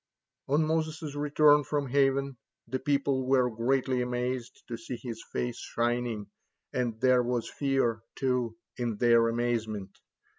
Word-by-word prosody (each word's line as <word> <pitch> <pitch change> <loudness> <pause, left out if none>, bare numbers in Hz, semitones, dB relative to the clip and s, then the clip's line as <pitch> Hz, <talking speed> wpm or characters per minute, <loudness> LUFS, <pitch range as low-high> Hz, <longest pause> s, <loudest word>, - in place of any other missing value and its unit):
On 150 +3 +3
Moses' 160 -1 -1
return 145 0 +4
from 145 -1 -2
heaven, 135 0 +2 0.3
the 130 - -2
people 140 -1 0
were 130 -2 +3
greatly 130 +2 +1
amazed 125 0 -3
to 120 - -4
see 115 +2 -6
his 115 -2 -7
face 120 -1 -2
shining, 120 -2 -1 0.5
and 120 -3 -1
there 130 -1 +5
was 120 -1 -1
fear, 135 -5 0
too, 125 -4 0 0.2
in 120 -3 -2
their 115 -1 +5
amazement. 115 -4 -2
125 Hz, 135 wpm, -29 LUFS, 120-140 Hz, 0.5 s, there